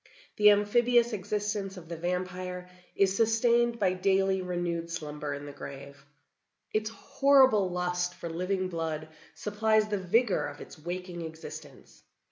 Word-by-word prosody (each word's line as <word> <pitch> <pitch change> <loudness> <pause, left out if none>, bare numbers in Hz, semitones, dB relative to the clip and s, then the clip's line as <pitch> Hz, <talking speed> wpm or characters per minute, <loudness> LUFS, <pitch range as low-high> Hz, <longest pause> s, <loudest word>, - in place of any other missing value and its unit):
The 210 0 +7
amphibious 235 +3 +3
existence 205 0 -3
of 170 -2 -10
the 170 - -5
vampire 180 +1 -3 0.3
is 195 -1 +3
sustained 235 +2 +3
by 190 -4 +2
daily 190 0 +2
renewed 175 -2 -2
slumber 150 -3 -5
in 145 +1 -8
the 145 - -7
grave. 140 0 -10 0.7
Its 215 0 0
horrible 260 -4 +4
lust 180 0 -1
for - - -7
living 185 +3 -1
blood 160 -3 -4 0.3
supplies 215 +1 +1
the 205 -1 -1
vigor 185 -4 +2
of - - -9
its - - -11
waking 175 +2 -5
existence. 155 -3 -10
185 Hz, 135 wpm, -29 LUFS, 170-210 Hz, 0.7 s, The